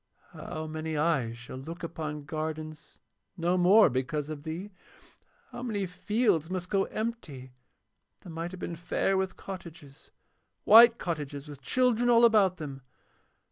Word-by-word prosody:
How 155 0 -6
many 155 0 -4
eyes 135 -7 0
shall 125 +2 -9
look 165 +7 -8
upon 155 -3 -5
gardens 155 +1 -6 0.4
no 175 +1 +1
more 190 +5 +6
because 140 +3 -2
of 150 -2 -6
thee? 170 +7 -6 0.8
How 240 - -7
many 215 -5 -2
fields 180 -2 0
must 185 -1 -4
go 195 -1 +2
empty 160 - -5 0.7
that 175 - -11
might 165 +1 -4
have 185 0 -10
been 170 - -5
fair 175 +3 -1
with 190 -1 -1
cottages, 165 -7 -10 0.5
white 230 +2 +8
cottages 150 -4 -5
with 145 -2 -10
children 245 - +2
all 235 0 +6
about 205 -5 +4
them? 140 -4 -7
165 Hz, 140 wpm, -29 LUFS, 150-195 Hz, 0.8 s, white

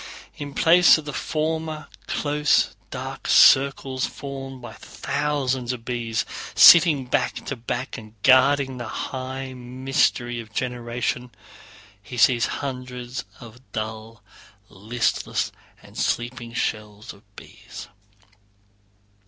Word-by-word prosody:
In 145 -1 -8
place 175 +1 +6
of 155 - -8
the 145 - -6
former 155 0 -3 0.2
close 150 0 +1
dark - - -7
circles 135 -1 +4
formed 135 -1 -8
by 120 - -10
thousands 140 -3 -2
of 115 -2 -9
bees 115 -3 -2 0.3
sitting 160 -6 +8
back 125 - -1
to 140 - -4
back 120 +2 -5
and 110 0 -14
guarding 135 0 +4
the 120 -2 -6
high 130 +2 -5
mystery 125 -1 -1
of 110 -1 -10
generation, 125 0 -3 0.7
he 125 +4 -9
sees 120 -1 +4 0.2
hundreds 125 -3 -6
of 120 0 -13
dull, 110 0 -6 0.5
listless, 110 +5 -2 0.3
and - - -17
sleepy 120 0 -2
shells 105 -2 -4
of 100 - -19
bees. - - -11
125 Hz, 110 wpm, -23 LUFS, 120-140 Hz, 0.7 s, sitting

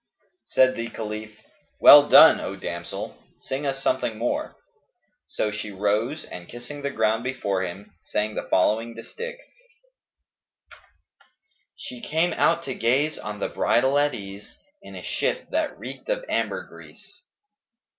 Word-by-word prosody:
" 360 - -49
Said 130 0 +5
the 115 0 -4
Caliph, 110 -1 -7 0.4
"Well 145 0 +9
done, 160 - +9
O 100 - -5
damsel! 85 -2 -6 0.2
Sing 140 +2 -4
us 135 0 -3
something 115 -4 0
more." 290 - -2 0.7
So 105 - -2
she 105 0 -5
rose 105 +9 -1
and 85 -1 -10
kissing 120 +5 -9
the 140 - -2
ground 110 -3 0
before 120 -7 -2
him, 95 +2 -7
sang 105 +1 -1
the - - -5
following 115 +5 +1
distich, 475 - -7 2.4
"She 250 -4 -9
came 170 -4 0
out 170 - +2
to 135 - -4
gaze 135 +7 +1
on 105 0 -6
the - - -2
bridal 135 +4 +2
at 145 0 +1
ease 100 0 -10
* 300 +1 -44
In - - -12
a - - -8
shift - - -2
that - - -1
reeked - - -9
of - - -1
ambergris." - - -5
120 Hz, 145 wpm, -24 LUFS, 105-145 Hz, 2.4 s, Well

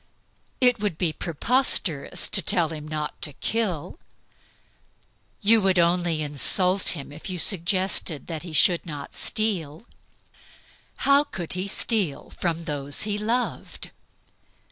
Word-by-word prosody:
It 250 -3 +3
would 205 -6 -2
be 165 -3 0
preposterous 175 - +1
to 195 - +3
tell 170 -1 +3
him 155 -1 -7
not 150 -1 -4
to 150 - -3
kill. 215 - -2 1.4
You 220 +1 +5
could 190 -1 +2
only 170 -2 +2
insult 180 +6 +2
him 140 0 -8
if 150 +5 -9
you 185 - -3
suggested 180 -3 +1
that 160 -3 -5
he 175 - -8
should 170 +2 +3
not 145 -4 -8
steal 195 -5 0 1.2
how 280 +1 +5
could 175 - -5
he 185 +2 -3
steal 195 - -1
from 170 -2 -3
those 145 -3 -3
he 210 -1 -2
loved? 235 +4 -3
175 Hz, 125 wpm, -24 LUFS, 155-205 Hz, 1.4 s, You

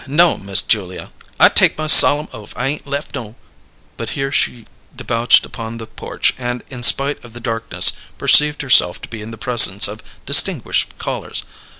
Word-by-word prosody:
No'm, 150 - 0
Miss 100 +2 +3
Julia, 95 -5 -4 0.3
I - - +6
take - - +2
my 155 - -5
solemn 150 0 +7
oaf 105 -4 -13
I 130 +2 -3
ain' 150 - -6
lef 140 +2 -7
no 115 -6 -9 0.3
" - - -37
But 115 - -7
here 135 0 -4
she 120 -4 -3 0.3
debouched 115 +1 0
upon 115 0 -10
the 115 - -10
porch, - - -4
and 120 -1 -6
in 125 -2 -10
spite 140 +4 +2
of 120 -2 -16
the 120 - -11
darkness 115 -2 -1 0.2
perceived 150 0 +2
herself 120 -9 +2
to - - -9
be 115 -2 -10
in 105 - -10
the 115 - -11
presence 110 -4 +4
of 105 +2 -10 0.2
distinguished - - +1
callers. - - -6
120 Hz, 185 wpm, -15 LUFS, 110-135 Hz, 0.3 s, solemn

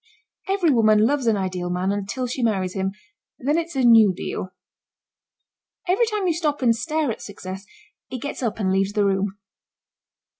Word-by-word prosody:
Every 385 -5 +2
woman 215 -3 +4
loves 270 0 0
an 220 -2 +3
ideal 185 -2 -3
man 180 +2 0
until 205 +6 -3
she 250 +1 -4
marries 195 -6 0
him 190 0 -1 0.5
then 290 +4 0
it's 335 -2 -5
a 265 - +1
new 225 -4 +7
deal. 185 - -5 1.4
Every 395 +6 +3
time 425 -3 -2
you 350 - +2
stop 300 -4 -1
and 230 -2 +4
stare 305 +2 -1
at - - -7
Success 195 0 -8 0.4
it 255 - -4
gets 285 +3 -5
up 225 -4 -2
and 190 -3 +1
leaves 195 +1 +1
the 205 -1 +2
room. 195 0 0
225 Hz, 175 wpm, -23 LUFS, 195-290 Hz, 1.4 s, new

